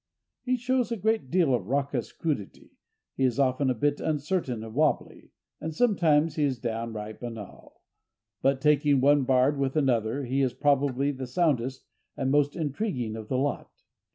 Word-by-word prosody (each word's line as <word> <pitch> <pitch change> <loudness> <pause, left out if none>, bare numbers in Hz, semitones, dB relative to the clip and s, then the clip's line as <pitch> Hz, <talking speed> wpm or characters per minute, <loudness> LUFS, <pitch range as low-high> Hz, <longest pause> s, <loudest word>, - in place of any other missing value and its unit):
He 255 0 0
shows 250 0 0
a 230 - -1
great 220 -7 0
deal 170 -5 +3
of 100 -7 -1
raucous 135 -2 -1
crudity, 145 -12 -4 0.4
he 135 - -2
is 125 -3 +2
often 135 0 +2
a 130 - +1
bit 145 +5 0
uncertain 150 -6 -1
and 110 -1 -9
wobbly, 155 +5 0 0.3
and 160 0 -5
sometimes 165 -8 +2
he 150 - +2
is 135 -3 +1
downright 110 -2 -5
banal—but, 120 +3 -6
taking 145 -1 +3
one 140 +1 +4
bard 130 +2 +3
with 135 0 -1
another, 130 -3 +1
he 135 +3 0
is 130 -2 0
probably 140 0 +1
the 130 -2 -6
soundest 130 -3 0 0.3
and 135 -1 0
most 145 0 +2
intriguing 145 - -2
of 110 -1 -7
the 130 - -1
lot. 140 +2 -3
140 Hz, 160 wpm, -27 LUFS, 125-150 Hz, 0.4 s, one